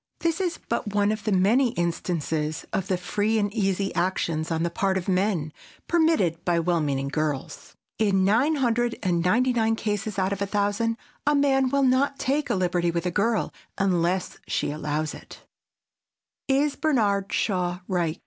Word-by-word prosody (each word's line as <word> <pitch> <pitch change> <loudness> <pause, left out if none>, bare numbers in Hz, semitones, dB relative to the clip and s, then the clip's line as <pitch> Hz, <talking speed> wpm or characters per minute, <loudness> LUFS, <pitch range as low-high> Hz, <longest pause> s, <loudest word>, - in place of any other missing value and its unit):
This 335 +2 0
is 350 -3 -1
but 210 -3 -2
one 205 0 +3
of 215 -2 -4
the 215 - +1
many 225 +7 +3
instances 160 - -2
of 195 - -1
the 185 - +1
free 205 +5 0
and 205 -1 0
easy 195 -2 0
actions 170 -3 -1
on 165 -1 0
the 170 - -1
part 190 +2 0
of 180 - -4
men, 185 -5 0 0.3
permitted 315 - +2
by 175 -1 +1
well 170 0 +1
meaning 140 -2 -1
girls. 150 -1 -3 0.2
In 195 -3 +3
nine 245 +11 +3
hundred 240 -3 +1
and 175 -2 +1
ninety 245 +8 +3
nine 225 -1 +2
cases 210 -2 -3
out 190 +1 +1
of 200 - -6
a 200 - 0
thousand 205 +3 0 0.3
a 295 - +4
man 270 -2 +3
will 280 +1 +2
not 265 +2 +2
take 285 +3 -1
a - - +1
liberty 175 -2 +1
with 170 +1 -2
a 180 - 0
girl 220 +4 0 0.2
unless 180 -1 0
she - - -1
allows 150 +1 -2
it. - - -12 1.1
[Sidenote: 275 +2 +4
IS 290 - -3
BERNARD 205 -10 +1
SHAW 180 -3 -1
RIGHT? 175 -3 -1
195 Hz, 175 wpm, -25 LUFS, 175-235 Hz, 1.1 s, a